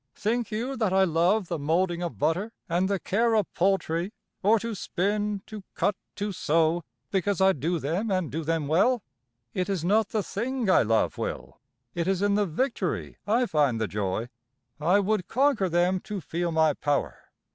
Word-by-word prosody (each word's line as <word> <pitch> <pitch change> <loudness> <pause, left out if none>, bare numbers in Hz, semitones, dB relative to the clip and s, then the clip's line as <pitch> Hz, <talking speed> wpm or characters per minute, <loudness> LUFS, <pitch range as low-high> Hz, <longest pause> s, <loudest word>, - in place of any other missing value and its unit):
Think 230 +2 -1
you 235 +5 -3
that 220 -5 +1
I 190 0 +4
love 180 +4 +2
the 170 -2 -3
molding 170 +4 +1
of 170 - -4
butter 185 - 0
and 175 +3 +1
the 200 - +1
care 225 +6 +1
of 210 -4 0
poultry, 180 -1 +1 0.3
or 215 +4 +5
to 230 +1 -4
spin, 205 +1 -1
to 215 -2 -9
cut, 205 - +1 0.2
to 205 0 -2
sew, 165 -1 +1 0.3
because 195 0 0
I 190 0 +5
do 165 +4 -1
them 165 +9 -2
and 185 -5 0
do 160 +2 -3
them 160 -1 -1
well? 200 - +3 0.5
It 185 +1 -1
is 185 -4 -1
not 210 +3 +3
the 215 -2 -1
thing 245 +4 -2
I - - +6
love, 110 -1 +1
Will 65 0 -5 0.3
it 170 0 -2
is 195 0 +1
in 205 0 +3
the 205 0 +2
victory 255 - -2
I 235 +4 +3
find 145 - +1
the 110 - 0
joy. 105 +3 -2 0.5
I 175 +6 +3
would 205 -2 0
conquer 255 -7 +2
them 175 +2 +2
to 205 +2 -5
feel 170 +3 -2
my 160 -2 +3
power. 145 0 -2
185 Hz, 185 wpm, -27 LUFS, 165-210 Hz, 0.5 s, I